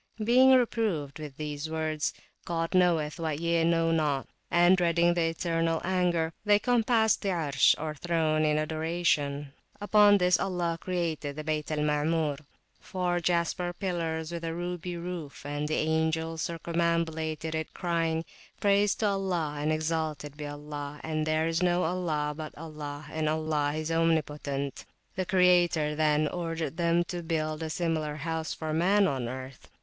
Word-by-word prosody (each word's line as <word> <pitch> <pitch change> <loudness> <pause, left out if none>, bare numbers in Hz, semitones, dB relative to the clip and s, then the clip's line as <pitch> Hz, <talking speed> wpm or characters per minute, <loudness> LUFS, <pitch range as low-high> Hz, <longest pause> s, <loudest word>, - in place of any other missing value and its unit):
Being 255 +4 +6
reproved 210 - 0
with 145 -3 -8
these 150 0 -4
words, 155 -1 -1 0.3
God 165 -1 -2
knoweth 170 -5 +2
what 155 -3 -2
ye 170 0 +1
know 165 0 +2
not, 150 -4 0 0.2
and 175 +2 +5
dreading 170 -1 +3
the 170 -1 +1
eternal 165 -1 0
anger, 175 -3 +1
they 205 -1 +5
compassed 225 -1 +2
the 200 - -1
Arsh, 150 -7 +3
or 155 0 -3
throne, 155 0 0
in 150 0 +2
adoration. 155 -3 -1 0.3
Upon 205 0 +5
this 180 -2 +3
Allah 175 -3 -1
created 165 -5 -2
the 155 - -5
Bayt 155 -1 -2
al 150 -1 -1
Maamur, 150 0 +1 0.4
four 180 -1 -1
jasper 175 +1 0
pillars 165 -4 -3
with 170 -1 -5
a 165 0 -3
ruby 175 0 -4
roof, 170 -4 -6
[p.320] 145 +1 -5
and 150 +1 -2
the 155 - 0
angels 160 +1 0
circumambulated 165 -2 -1
it, 160 0 -3
crying, 165 -2 -1 0.3
Praise 200 0 +3
to 220 - -1
Allah, 185 -7 -1
and 150 +1 0
exalted 155 -2 -2
be 150 0 -6
Allah, 145 0 -7
and 155 -1 -2
there 155 0 +1
is 165 +1 0
no 180 0 +2
ilah 160 -4 -1
but 155 0 -7
Allah, 150 -2 -7
and 155 -1 -1
Allah 155 -2 0
is 155 +1 -3
omnipotent! 150 -4 -1 0.3
The 185 -1 -2
Creator 175 -4 +3
then 150 0 +2
ordered 165 -2 -3
them 170 0 +2
to 175 0 -5
build 155 -2 -2
a 160 - -3
similar 155 -3 -1
house 160 +1 -3
for 155 -1 -4
man 195 +5 +3
on 130 -7 -2
earth. 130 +1 -8
160 Hz, 155 wpm, -28 LUFS, 155-175 Hz, 0.4 s, Being